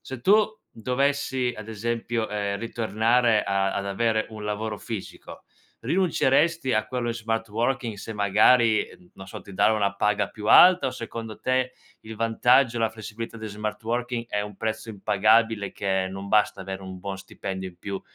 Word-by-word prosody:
se 130 -2 -8
tu 210 - +5 0.2
dovessi, 130 +1 -1
ad 110 0 -9
esempio, 115 +1 -2
ehm, 100 -1 -2
ritornare 115 +1 +1
a 95 0 0
ad 100 - -2
avere 110 +2 0
un 110 -1 -8
lavoro 105 0 -3
fisico, 110 -5 -8 0.4
rinunceresti 170 -4 +2
a 110 0 +1
quello 125 -2 -3
in 115 - -1
smart 115 0 -3
working 120 +2 -1
se 110 - -7
magari, 110 +2 +4 0.3
non 95 - -11
so, 95 - -8
ti 100 - -12
danno 110 +3 +3
una 100 -1 0
paga 105 +1 +1
più 105 -1 -8
alta? 180 +9 +7
O - - -4
secondo 115 -2 -7
te, 130 0 0 0.3
il 110 0 -10
vantaggio 120 +3 +3
e - - -1
la 115 -1 +2
flessibilità 110 +1 -7
di 110 - -6
smart 105 +1 -5
working 120 +1 -2
è 105 - -1
un 105 -1 -8
prezzo 110 +1 -3
impagabile 110 +1 +2
che 95 -1 -1
non 95 +1 -7
basta 105 -2 +2
avere 95 0 -6
un 95 -1 -8
buon 95 +1 -5
stipendio 95 -1 -6
in 90 - -25
più 100 +1 -5
110 Hz, 175 wpm, -25 LUFS, 100-120 Hz, 0.4 s, alta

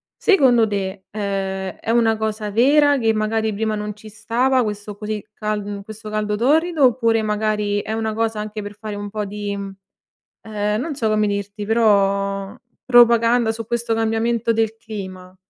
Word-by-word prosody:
Secondo 255 - +4
te, 195 -1 -4
ehm, 195 -2 -3
è - - -7
una 225 -1 +3
cosa 215 -1 -3
vera 285 +5 +4
che 225 -1 +2
magari 220 0 0
prima 215 +1 -1
non 210 0 -4
ci 215 +1 -13
stava 235 +5 +1
questo 210 -1 -4
così 210 0 -5
cal 215 -1 -3
mhmm, 200 0 -6
questo 215 +1 -9
caldo 210 -1 -1
torrido, 310 +7 +2
oppure 230 -2 +2
magari 210 -1 0
è 220 - -5
una 220 -1 -2
cosa 225 0 -1
anche 215 0 -5
per 205 0 -8
fare 215 0 -6
un 205 0 -5
po' 210 0 -3
di 205 0 -4
mhmm, 195 -1 -7 0.7
ehm, 210 0 -2
non 310 +1 -3
so 235 -5 -1
come 215 -1 +2
dirti 200 +1 -4
però 200 -2 +2 0.3
propaganda 235 -1 +5
su 225 0 -6
questo 235 0 -1
cambiamento 225 +1 0
del 225 0 0
clima? 190 -4 -8
215 Hz, 170 wpm, -21 LUFS, 205-225 Hz, 0.7 s, propaganda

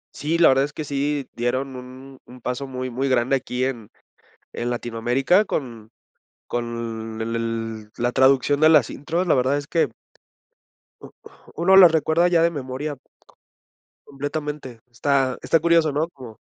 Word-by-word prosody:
Sí, 155 +3 -1
la 170 - +6
verdad 135 +1 +3
es 145 - -9
que 155 - -5
sí 145 -1 -2
dieron 130 +3 -2
un 130 +1 -11
un 125 - -14
paso 125 +3 -4
muy 130 -1 -5
muy 135 +3 -1
grande 130 +1 +2
aquí 125 -1 -3
en 120 -6 -5 0.6
en 120 - -3
Latinoamérica 120 - +1
con 115 -9 -5 0.6
con 115 -2 -5
el 115 +1 -3
el 115 -2 -4
la 120 +1 -1
traducción 135 +2 +3
de 155 - +6
las 150 -8 +5
intros. 165 +6 -3
La 170 - +4
verdad 130 +1 +2
es 145 - -7
que 160 -1 +1 1.7
uno 190 +3 +4
las 185 -3 +9
recuerda 160 +2 +2
ya 175 -2 +3
de 170 - +3
memoria. 145 0 -5 1.1
Completamente, 145 -3 -5
está 130 +1 0
está 165 - +2
curioso, 165 -1 +3
¿no? 150 +3 0
Como 125 -9 -12
135 Hz, 155 wpm, -22 LUFS, 120-150 Hz, 1.7 s, las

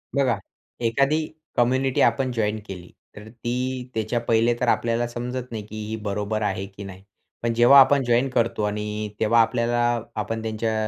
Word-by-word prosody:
बघा, 130 -6 +2 0.4
एखादी 140 +7 +1 0.3
कम्युनिटी 130 +2 +2
आपण 130 +2 +2
जॉइन्ड 110 -2 -1
केली, 90 -2 -9 0.2
तर 105 +1 -11
ती 125 +2 -4
त्याच्या 110 +2 -1
पहिले 115 0 +2
तर 125 - 0
आपल्याला 115 0 +1
समजत 125 +1 -5
नाही, 110 -2 -5
की 110 0 -7
ही 110 - -3
बरोबर 105 +1 -2
आहे 100 -2 -1
की 100 +1 -11
नाही. 95 -1 -10 0.4
पण 115 - +1
जेव्हा 120 +4 +7
आपण 135 +1 +5
जॉइन्ड 120 +2 +2
करतो 115 -2 0
आणि 105 0 -3
तेव्हा 115 +1 +4
आपल्याला 120 +1 +1 0.4
आपण 115 +1 -4
त्यांच्या 110 0 -2
115 Hz, 165 wpm, -24 LUFS, 105-125 Hz, 0.4 s, जेव्हा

